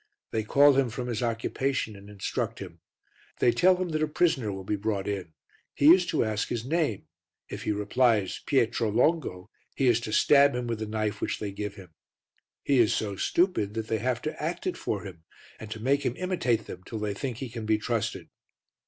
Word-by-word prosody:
They 110 Hz, -, 0 dB
call 140 Hz, +6 st, +5 dB
him 135 Hz, -2 st, +2 dB
from 125 Hz, +2 st, -5 dB
his 115 Hz, -1 st, -2 dB
occupation 115 Hz, 0 st, -1 dB
and 100 Hz, +1 st, -13 dB
instruct 100 Hz, -2 st, -3 dB
him. -, -, -9 dB, 0.6 s
They 120 Hz, -, +4 dB
tell 185 Hz, +7 st, +4 dB
him 180 Hz, -1 st, -3 dB
that 155 Hz, -1 st, -1 dB
a 155 Hz, -, +2 dB
prisoner 150 Hz, -8 st, +1 dB
will 95 Hz, 0 st, -6 dB
be 105 Hz, -, -1 dB
brought 100 Hz, -1 st, -2 dB
in, 95 Hz, -5 st, -4 dB, 0.4 s
he 150 Hz, +4 st, +8 dB
is 180 Hz, -1 st, +2 dB
to 155 Hz, -, +1 dB
ask 110 Hz, 0 st, -1 dB
his 115 Hz, -1 st, -3 dB
name, 150 Hz, -, -1 dB, 0.4 s
if -, -, -6 dB
he -, -, +1 dB
replies 105 Hz, -1 st, +1 dB
"Pietro 120 Hz, -4 st, +2 dB
Longo," 120 Hz, -, 0 dB, 0.2 s
he 135 Hz, -, +1 dB
is 120 Hz, -2 st, +4 dB
to 110 Hz, -, -6 dB
stab 140 Hz, +3 st, +5 dB
him 125 Hz, 0 st, -2 dB
with 115 Hz, -2 st, -3 dB
the 110 Hz, -, -4 dB
knife 105 Hz, -1 st, -2 dB
which -, -, -1 dB
they 105 Hz, -2 st, -4 dB
give 105 Hz, 0 st, -5 dB
him. 90 Hz, -5 st, -13 dB, 0.7 s
He 140 Hz, -3 st, +3 dB
is 115 Hz, -3 st, +4 dB
so 100 Hz, -2 st, -2 dB
stupid 110 Hz, -, +1 dB
that 110 Hz, -1 st, -4 dB
they 110 Hz, -, 0 dB
have 125 Hz, -1 st, -1 dB
to 155 Hz, -, -4 dB
act 170 Hz, +3 st, -3 dB
it 185 Hz, -, -1 dB
for 105 Hz, -, -3 dB
him, 90 Hz, -5 st, -10 dB, 0.4 s
and 110 Hz, -, -8 dB
to 110 Hz, 0 st, -6 dB
make 135 Hz, +5 st, +1 dB
him 125 Hz, -3 st, -1 dB
imitate 165 Hz, -, 0 dB
them 90 Hz, -, -9 dB
till 110 Hz, -, -6 dB
they 105 Hz, -1 st, -2 dB
think 125 Hz, +2 st, -4 dB
he 135 Hz, -, -5 dB
can 115 Hz, -2 st, -6 dB
be 110 Hz, 0 st, +3 dB
trusted. 115 Hz, +1 st, -3 dB
115 Hz, 215 wpm, -27 LUFS, 105-140 Hz, 0.7 s, he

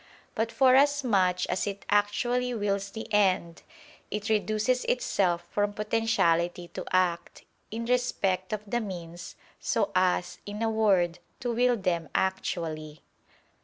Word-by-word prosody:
But 225 Hz, +1 st, -1 dB
forasmuch 255 Hz, -8 st, +3 dB
as 185 Hz, +3 st, -1 dB
it 200 Hz, 0 st, -5 dB
actually 240 Hz, +5 st, +1 dB
wills 200 Hz, -2 st, -1 dB
the 220 Hz, +2 st, -7 dB
end, 185 Hz, -5 st, +2 dB, 0.5 s
it 210 Hz, +2 st, -4 dB
reduces 215 Hz, +3 st, +1 dB
itself 180 Hz, -8 st, +1 dB
from 205 Hz, 0 st, 0 dB
potentiality 175 Hz, -6 st, +1 dB
to -, -, -6 dB
act, 180 Hz, -2 st, 0 dB, 0.3 s
in 230 Hz, +2 st, -4 dB
respect 205 Hz, -7 st, 0 dB
of 215 Hz, -1 st, -2 dB
the 240 Hz, +4 st, -1 dB
means, 175 Hz, -4 st, -7 dB, 0.2 s
so -, -, 0 dB
as, 185 Hz, -1 st, +1 dB
in 205 Hz, +2 st, -4 dB
a 225 Hz, -, +1 dB
word, 195 Hz, -6 st, +2 dB, 0.2 s
to 240 Hz, -1 st, -1 dB
will 245 Hz, +1 st, +3 dB
them 170 Hz, -5 st, -1 dB
actually. 160 Hz, -5 st, -2 dB
205 Hz, 130 wpm, -28 LUFS, 180-225 Hz, 0.5 s, forasmuch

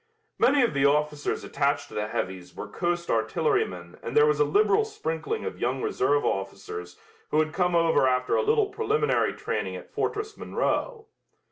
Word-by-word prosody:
Many 280 Hz, -1 st, +4 dB
of 235 Hz, -, +1 dB
the 140 Hz, -, +1 dB
officers 150 Hz, +1 st, +1 dB
attached 140 Hz, 0 st, 0 dB
to -, -, -13 dB
the 105 Hz, 0 st, -2 dB
heavies 90 Hz, -4 st, -4 dB
were -, -, -6 dB
coast 175 Hz, 0 st, -2 dB
artillerymen 110 Hz, -, -1 dB
and 120 Hz, -, -3 dB
there 150 Hz, -, +7 dB
was 150 Hz, -1 st, +2 dB
a -, -, +6 dB
liberal 205 Hz, -, +3 dB
sprinkling 165 Hz, -, -4 dB
of -, -, -5 dB
young 125 Hz, +2 st, -1 dB
reserve 145 Hz, +3 st, +1 dB
officers 95 Hz, -2 st, -4 dB, 0.3 s
who -, -, 0 dB
had 155 Hz, 0 st, 0 dB
come 180 Hz, -2 st, +1 dB
over 165 Hz, -5 st, +4 dB
after 125 Hz, 0 st, +1 dB
a -, -, +3 dB
little 440 Hz, -1 st, +3 dB
preliminary 440 Hz, +1 st, +1 dB
training -, -, -3 dB
at -, -, -10 dB
Fortress 425 Hz, 0 st, -2 dB
Monroe. 460 Hz, -3 st, -2 dB
150 Hz, 170 wpm, -26 LUFS, 125-210 Hz, 0.3 s, there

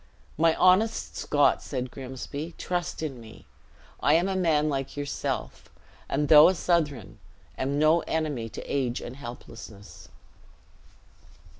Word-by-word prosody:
"My 165 Hz, +1 st, +3 dB
honest 195 Hz, +5 st, +3 dB
Scot," 145 Hz, -1 st, +2 dB
said 130 Hz, -2 st, -4 dB
Grimsby, 135 Hz, +5 st, -7 dB
"trust 175 Hz, -2 st, -3 dB
in 135 Hz, -6 st, -5 dB
me. 110 Hz, -1 st, -14 dB, 0.5 s
I 145 Hz, -, +3 dB
am 175 Hz, +3 st, +2 dB
a 195 Hz, -, -1 dB
man 160 Hz, -5 st, +2 dB
like 135 Hz, -1 st, -3 dB
yourself; 145 Hz, -1 st, -4 dB, 0.4 s
and 145 Hz, +2 st, 0 dB
though 150 Hz, +1 st, +9 dB
a 190 Hz, -, 0 dB
Southron, 150 Hz, -, -1 dB, 0.4 s
am 140 Hz, +2 st, -2 dB
no 155 Hz, +3 st, +4 dB
enemy 145 Hz, -8 st, -2 dB
to -, -, -8 dB
age 130 Hz, -4 st, -1 dB
and 120 Hz, -, -8 dB
helplessness." 115 Hz, -5 st, -11 dB
145 Hz, 130 wpm, -27 LUFS, 130-165 Hz, 0.5 s, though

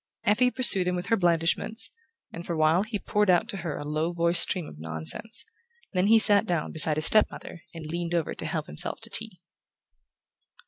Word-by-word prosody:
Effie 240 Hz, +5 st, +1 dB
pursued 220 Hz, -8 st, +8 dB
him 180 Hz, -, -1 dB
with 180 Hz, -, -5 dB
her 230 Hz, -, +3 dB
blandishments, 175 Hz, +4 st, -1 dB, 0.4 s
and 170 Hz, -, -8 dB
for 175 Hz, -, -6 dB
a -, -, -5 dB
while 155 Hz, +3 st, +2 dB
he 215 Hz, +1 st, -5 dB
poured 210 Hz, 0 st, -2 dB
out 180 Hz, +5 st, +2 dB
to 205 Hz, -, -6 dB
her 165 Hz, -5 st, -6 dB
a -, -, -8 dB
low 155 Hz, +3 st, -3 dB
voiced 170 Hz, 0 st, 0 dB
stream 180 Hz, -5 st, -1 dB
of 75 Hz, -, -14 dB
nonsense; 80 Hz, -, -5 dB, 0.5 s
then 185 Hz, +1 st, 0 dB
he 225 Hz, +1 st, +5 dB
sat 215 Hz, -1 st, +3 dB
down 170 Hz, -4 st, -3 dB
beside 155 Hz, -1 st, 0 dB
his 155 Hz, -, -1 dB
step 215 Hz, +4 st, +5 dB
mother 170 Hz, -, -12 dB
and 165 Hz, -1 st, -9 dB
leaned 170 Hz, 0 st, -4 dB
over 165 Hz, -3 st, -3 dB
to -, -, -8 dB
help 155 Hz, -2 st, -4 dB
himself 75 Hz, -, -4 dB
to -, -, -8 dB
tea. -, -, -2 dB
175 Hz, 210 wpm, -25 LUFS, 160-205 Hz, 0.5 s, pursued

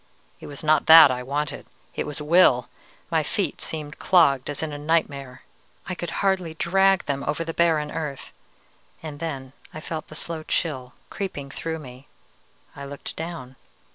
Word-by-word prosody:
_ -, -, -36 dB, 0.4 s
It -, -, -10 dB
was 145 Hz, +1 st, -7 dB
not 155 Hz, 0 st, +3 dB
that 160 Hz, -3 st, +10 dB
I 125 Hz, 0 st, -2 dB
wanted, 145 Hz, +4 st, -3 dB, 0.3 s
it -, -, -3 dB
was 150 Hz, -, -2 dB
will! 150 Hz, -5 st, +4 dB, 0.4 s
My -, -, +3 dB
feet -, -, -2 dB
seemed 150 Hz, -2 st, -4 dB
clogged 145 Hz, -8 st, +4 dB
as 145 Hz, +2 st, -4 dB
in 155 Hz, -2 st, -3 dB
a -, -, -4 dB
nightmare. 140 Hz, -4 st, -1 dB, 0.4 s
I 185 Hz, -, -4 dB
could 175 Hz, -1 st, -5 dB, 0.2 s
hardly 185 Hz, -4 st, +1 dB
drag 195 Hz, +3 st, +3 dB
them 140 Hz, -1 st, -2 dB
over 150 Hz, +3 st, -1 dB
the 165 Hz, 0 st, -5 dB
barren 160 Hz, -3 st, +2 dB
earth. 150 Hz, -5 st, -5 dB, 0.7 s
And 150 Hz, -2 st, -7 dB
then 135 Hz, -5 st, -5 dB, 0.2 s
I -, -, -5 dB
felt 155 Hz, 0 st, -6 dB
the 155 Hz, -, -10 dB
slow 165 Hz, 0 st, -3 dB
chill 130 Hz, -6 st, -2 dB, 0.2 s
creeping 145 Hz, -9 st, -5 dB
through 160 Hz, +3 st, -4 dB
me. 130 Hz, -2 st, -12 dB, 0.7 s
I 140 Hz, -, -8 dB
looked 140 Hz, 0 st, -7 dB
down. 160 Hz, -6 st, -7 dB
155 Hz, 170 wpm, -24 LUFS, 140-165 Hz, 0.7 s, that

